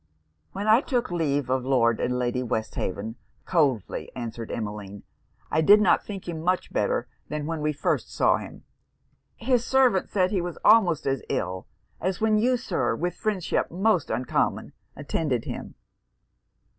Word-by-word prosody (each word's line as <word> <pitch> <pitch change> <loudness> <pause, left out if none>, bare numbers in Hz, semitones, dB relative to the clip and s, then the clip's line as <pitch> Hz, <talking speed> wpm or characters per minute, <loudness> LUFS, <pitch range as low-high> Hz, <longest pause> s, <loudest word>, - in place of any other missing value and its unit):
'When 200 +2 -4
I 220 +4 +6
took 245 -7 -1
leave 145 -6 0
of 130 -1 +1
Lord 120 -4 +2
and 125 0 0
Lady 125 0 -1
Westhaven,' 110 -2 -3 0.3
coldly 140 - 0
answered 115 -2 -6
Emmeline, 105 -2 -5 0.5
'I 160 - +3
did 205 +7 +7
not 210 - +3
think 195 -3 -7
him 165 -2 -4
much 180 +2 -1
better - - 0 0.2
than 150 -1 -3
when 160 0 -3
we 150 0 +1
first 145 - -1
saw - - +3
him. - - -10 0.7
His 245 0 +1
servant 255 -7 +3
said 185 -2 +1
he 195 -4 +1
was 175 -1 -5
almost 200 -8 +5
as 135 -1 0
ill 90 0 -2 0.3
as 185 0 -2
when 215 -1 +3
you, 250 +3 +3
Sir, 130 - -1
with 175 +6 -2
friendship 205 -3 -1
so 195 +3 +2
uncommon, 120 +2 -1 0.2
attended 140 -3 -2
him.' - - -6
160 Hz, 155 wpm, -26 LUFS, 125-205 Hz, 0.7 s, did